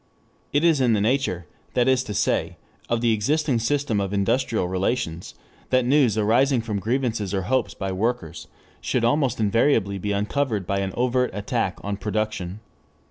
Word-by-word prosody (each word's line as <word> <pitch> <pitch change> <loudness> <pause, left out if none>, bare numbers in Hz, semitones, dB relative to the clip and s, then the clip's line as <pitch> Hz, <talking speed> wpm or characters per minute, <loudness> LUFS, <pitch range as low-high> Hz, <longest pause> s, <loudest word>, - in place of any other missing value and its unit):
It 145 +2 +2
is 165 -5 +4
in 120 -3 +3
the 105 - +2
nature, 110 - 0 0.3
that 120 0 +3
is 130 -1 +3
to 105 -4 -5
say, 105 - 0 0.3
of 115 -1 0
the 115 -1 +3
existing 140 +4 +1
system 115 -3 0
of 100 0 -3
industrial 100 0 +1
relations 95 -2 -2 0.3
that 130 -1 +3
news 130 -5 +3
arising 120 +4 +3
from 110 -3 -3
grievances 115 -3 -1
or 95 - -1
hopes 130 +6 0
by 95 -1 -3
workers 95 -4 -2 0.3
should 120 -2 0
almost 130 -1 +1
invariably 105 -2 +2
be 105 +2 -2
uncovered 105 +1 -1
by 100 +2 -1
an 95 -1 -2
overt 125 +1 +1
attack 105 0 -2
on 100 0 -3
production. 105 -2 -3
110 Hz, 165 wpm, -24 LUFS, 100-130 Hz, 0.3 s, is